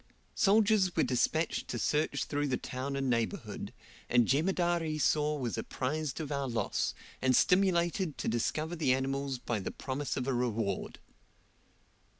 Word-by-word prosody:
Soldiers 205 -2 +3
were 160 - +3
despatched 130 +6 0
to - - -3
search 150 +1 0
through 145 0 -1
the 130 -2 0
town 130 +2 -4
and 135 -1 -1
neighbourhood, 115 -2 -2 0.4
and 120 -1 +5
Jemadar 175 +3 +2
Esau 150 -1 +1
was 125 -5 -2
apprised 150 +2 -3
of 150 -2 -4
our 140 -1 -1
loss, 115 -5 -1 0.3
and 130 -1 +3
stimulated 180 -2 +2
to - - -4
discover 155 +8 -1
the 140 -6 +2
animals 135 0 -2
by 120 -2 -2
the 95 - -4
promise 135 +2 -4
of 130 - -1
a 135 - +1
reward. 115 -5 -1
140 Hz, 150 wpm, -31 LUFS, 125-160 Hz, 0.4 s, and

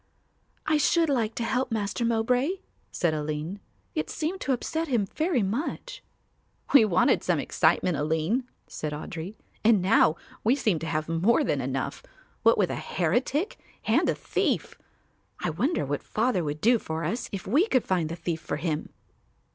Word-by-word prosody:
"I 310 0 +3
should 325 +2 +3
like 230 -5 0
to 235 - -2
help 255 +2 0
Master 215 +1 -1
Mowbray," 245 +7 +2 0.4
said 170 -3 +1
Aline. 155 +5 -3 0.3
"It 155 0 -2
seemed 330 +5 -3
to - - -1
upset 320 +6 -1
him 240 -7 +1
very 310 - 0
much." 305 - -3 0.7
"We 265 -6 +8
wanted 185 -3 +3
some - - +2
excitement, 180 - +2
Aline," 160 - 0 0.2
said 150 -1 -5
Audry, 165 +6 -6 0.3
"and 220 -2 +5
now 180 -4 +4 0.3
we 235 +5 +4
seem 215 - +1
to 165 - -5
have 155 -1 -1
more 180 - +3
than - - 0
enough, - - -3 0.4
what - - +5
with - - +2
a - - -3
heretic 290 - -1 0.3
and - - +3
a - - +1
thief. - - -1 0.7
I - - -1
wonder 280 - 0
what 145 +1 -2
Father 220 -5 0
would 150 0 -4
do 235 +3 +4
for 160 -2 -4
us 215 +10 -2
if 195 -2 -5
we 290 - +3
could 255 - +2
find 175 -4 0
the 165 - -4
thief 165 -1 -3
for - - -3
him." 155 -1 -2
215 Hz, 170 wpm, -27 LUFS, 165-255 Hz, 0.7 s, We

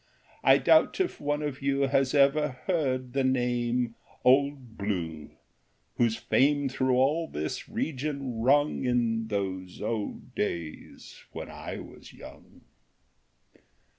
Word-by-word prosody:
I - - +7
doubt - - +4
if 375 - -1
one 145 +1 -1
of 145 -3 -4
you 140 0 +1
Has 135 0 +2
ever 145 0 +3
heard 130 -8 -1
the 135 -1 +1
name 120 -2 0 0.2
" - - -29
Old 135 -2 +3
Blue," 85 -7 -3 0.7
Whose 115 -2 +2
fame 145 +1 +2
through 130 0 +1
all 150 +6 +2
this 75 - -5
region 140 -4 -3
rung 145 +5 +3
In 115 -3 +1
those 95 -3 -4
old 110 -3 -4
days 80 -2 -5
when - - -7
I - - -7
was - - -12
young - - -14
130 Hz, 125 wpm, -28 LUFS, 115-140 Hz, 0.7 s, I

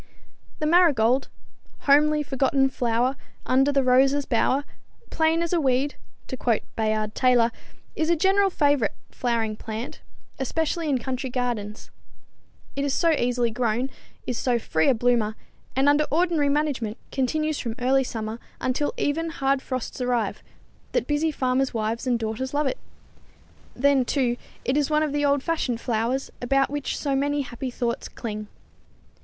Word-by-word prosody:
The 305 - -2
marigold, 280 -7 +4 0.5
"homely 300 +1 +4
forgotten 270 0 +2
flower, 245 +1 0 0.3
under 270 +2 +3
the 275 -1 +2
rose's 270 +3 +4
bower, 265 +4 +1 0.5
plain 320 +1 +2
as 340 - -2
a 340 - +2
weed," 270 +1 +1 0.3
to - - -5
quote 235 -3 0
Bayard 215 -1 0
Taylor, 245 -2 +3 0.4
is 315 +1 0
a 340 - +4
general 390 +4 +3
favorite 285 - +1 0.2
flowering 230 -3 -1
plant, 220 +2 -6 0.4
especially 320 +4 -1
in 275 - +2
country 260 +2 -3
gardens. 240 -4 -3 0.8
It 280 - -1
is 280 -1 0
so 335 -2 +3
easily 245 -5 +1
grown, 240 +2 -1 0.3
is 250 - -2
so 245 -2 +1
free 160 -8 0
a 265 - +5
bloomer, 230 -2 +1 0.4
and 270 +2 +3
under 290 +1 +4
ordinary 325 -2 +2
management 280 -7 -1
continues 305 +3 0
from 230 -2 -4
early 265 +2 +3
summer 225 -2 -5 0.2
until 260 +3 -1
even 330 +3 0
hard 275 -3 0
frosts 255 -1 -4
arrive, 240 -4 0 0.5
that - - +1
busy 295 +2 +1
farmers 260 -2 0
wives 225 +3 -2
and 245 -1 +2
daughters 230 +5 -3
love 295 +1 +1
it. 390 - -2 1.0
Then, 275 0 +3
too, 245 -3 0 0.3
it 255 - +1
is 295 -1 +1
one 305 0 +3
of 305 - -1
the 290 0 0
old 280 -1 +2
fashioned 280 -8 -1
flowers, 235 +3 -1
about 270 +2 +2
which 290 -1 -2
so 280 -2 -1
many 285 +1 +1
happy 255 0 -5
thoughts 240 -1 -3
cling. 215 -2 -6
265 Hz, 155 wpm, -25 LUFS, 240-290 Hz, 1.0 s, a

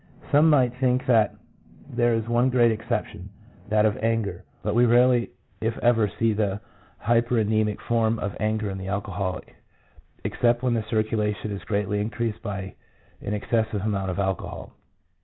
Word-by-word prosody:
Some 150 +3 +6
might 130 -5 +4
think 130 0 +1
that 115 -5 +3 0.5
there 120 -1 +1
is 115 0 -2
one 120 +2 +2
great 120 -2 +4
exception, 110 -3 -4 0.4
that 105 0 +3
of 105 - +1
anger; 110 -6 -1 0.2
but 105 - -1
we 120 +2 +4
rarely 120 +1 +4 0.3
if 115 +1 -1
ever 115 -3 +3
see 115 -1 +2
that 100 -2 -1 0.4
hypernemic 110 -3 +1
form 115 -1 +1
of 100 -2 -4
anger 110 -1 -1
in 95 - -5
the 95 - -6
alcoholic, 95 -1 -4 0.7
except 120 0 +1
when 125 -2 +2
the 115 - +1
circulation 110 -1 -1
is 100 - -5
greatly 105 0 -1
increased 110 0 -3
by 100 -3 -5 0.5
an 105 - -2
excessive 110 -1 -1
amount 100 -3 -1
of 90 - -3
alcohol. 95 -2 -3
110 Hz, 155 wpm, -25 LUFS, 105-120 Hz, 0.7 s, Some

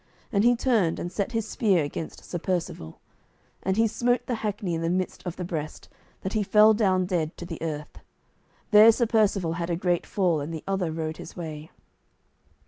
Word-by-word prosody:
And 200 -3 +2
he 245 +1 +5
turned, 225 -9 +1
and 175 - -4
set 200 +3 -2
his 225 -1 -1
spear 195 -8 +2
against 145 +2 -6
Sir 175 - -4
Percivale; 165 - -3 0.6
and 190 +1 -1
he 225 - +4
smote 245 +2 0
the 250 - -2
hackney 205 -4 -2
in 165 - -2
the 165 - 0
midst 185 +1 -2
of 175 - -4
the 180 - -5
breast, 155 -3 -5 0.3
that 190 - -4
he 215 - +1
fell 210 +2 +6
down 190 -4 +2
dead 170 -4 -2
to 175 - -7
the 165 -2 -7
earth. 150 -2 -5 0.7
There 215 +2 +9
Sir 235 +2 +1
Percivale 200 -7 +1
had 170 0 -2
a 170 - +1
great 175 0 0
fall, 175 -6 +1
and 145 +3 -5
the 160 -2 -6
other 190 -4 -1
rode 155 0 -4
his - - -10
way. 155 -2 -6
185 Hz, 200 wpm, -26 LUFS, 165-210 Hz, 0.7 s, There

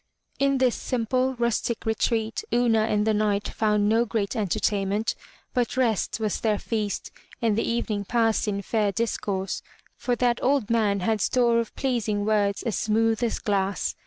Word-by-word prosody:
In 275 0 +3
this 255 -2 +3
simple, 255 +2 -1
rustic 235 -1 -1
retreat 225 - 0
Una 230 -3 +3
and 210 -1 +1
the 220 - +2
Knight 210 -1 +1
found 210 -1 +1
no 225 +2 +3
great 215 -3 -2
entertainment, 205 +1 0 0.4
but 245 -1 0
rest 230 -4 +1
was 215 -2 -1
their 215 -2 +1
feast 210 -1 -3 0.3
and 225 -3 +1
the 230 - 0
evening 220 -3 -1
passed 225 0 +1
in 200 -1 -2
fair 210 0 +1
discourse, 195 -3 -2 0.3
for 245 - -1
that 240 -1 +1
old 265 -4 +1
man 210 -4 +2
had 220 +2 0
store 235 +1 +3
of 230 - -4
pleasing 225 -6 -1
words 205 -2 +1
as 230 -6 -1
smooth 225 +1 +1
as 235 -2 0
glass. 195 -2 -1
220 Hz, 160 wpm, -25 LUFS, 205-235 Hz, 0.4 s, In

